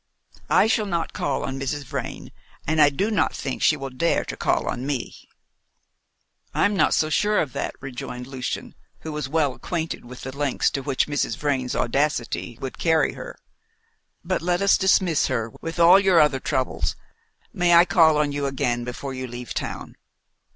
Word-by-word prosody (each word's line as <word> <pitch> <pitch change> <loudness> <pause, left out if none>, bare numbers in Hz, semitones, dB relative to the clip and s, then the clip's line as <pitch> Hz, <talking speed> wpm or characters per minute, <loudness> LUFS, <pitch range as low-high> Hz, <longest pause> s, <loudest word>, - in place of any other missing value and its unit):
I - - +5
shall 220 -1 +1
not 170 -4 -2
call 140 - -2
on 135 0 -4
Mrs. 140 +2 -3
Vrain, 125 - -6 0.3
and 155 +1 +2
I 145 - +7
do 195 +10 -1
not 210 - +1
think 135 - -4
she 155 - +4
will 135 -1 -6
dare 150 +7 0
to - - -5
call - - 0
on 120 - -3
me." 135 -3 -3 1.4
"I'm 205 0 +2
not 155 -6 +3
so 155 0 +1
sure 210 +6 +2
of 140 -6 -2
that," - - -3
rejoined 125 -1 -6
Lucian, 130 -3 -5 0.3
who 160 - -6
was 150 -3 -4
well 150 -3 +1
acquainted 165 +3 -4
with 125 +1 -11
the 130 +1 -7
lengths 145 -2 0
to 135 - -3
which 135 -1 0
Mrs. 145 -6 -1
Vrain's 135 -4 -1
audacity 120 -3 -1
would 135 - -6
carry 160 -2 +2
her; - - -9 0.9
"but - - -1
let 175 +2 0
us 200 - +5
dismiss 190 -4 +3
her, 115 0 -2
with 165 +1 -5
all 175 +3 +8
your 190 -4 +4
other 150 -3 +3
troubles. 130 0 -1 0.6
May 175 -1 +3
I 170 +1 +8
call 165 -3 +5
on 150 -1 +1
you 140 0 -2
again 120 -3 -1
before 125 +3 -5
you 130 0 -5
leave 120 -1 -7
town?" - - -5
145 Hz, 180 wpm, -24 LUFS, 130-165 Hz, 1.4 s, all